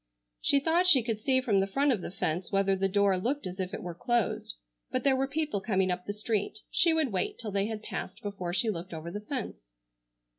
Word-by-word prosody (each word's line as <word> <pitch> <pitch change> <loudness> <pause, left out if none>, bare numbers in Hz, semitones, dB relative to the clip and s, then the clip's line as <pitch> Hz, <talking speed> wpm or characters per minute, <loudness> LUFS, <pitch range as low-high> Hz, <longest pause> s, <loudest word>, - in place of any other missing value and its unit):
She 280 - +4
thought 335 +5 +2
she 270 -9 +8
could 220 -2 -2
see 260 +3 +2
from 215 -6 +2
the 195 - +1
front 275 +8 +2
of 220 -7 0
the - - -5
fence 175 -1 -2
whether 195 -1 +2
the 195 +1 +1
door 195 -1 +2
looked 260 +6 -1
as 185 +1 -6
if 185 0 -2
it - - -6
were 175 -1 -5
closed. 240 - -1 0.3
But 255 - -1
there 275 -2 +4
were 270 +1 0
people 300 -7 -2
coming 190 -3 +1
up 180 0 -4
the - - -1
street. 210 0 -2
She 340 - +4
would 315 -6 +1
wait 185 -2 -1
till 220 -3 -5
they 200 +1 0
had 220 -1 -5
passed - - -6
before 195 -4 -4
she 220 +5 +1
looked 175 -2 -6
over 160 +2 -6
the 205 - -5
fence. - - -6
205 Hz, 235 wpm, -29 LUFS, 185-260 Hz, 0.3 s, she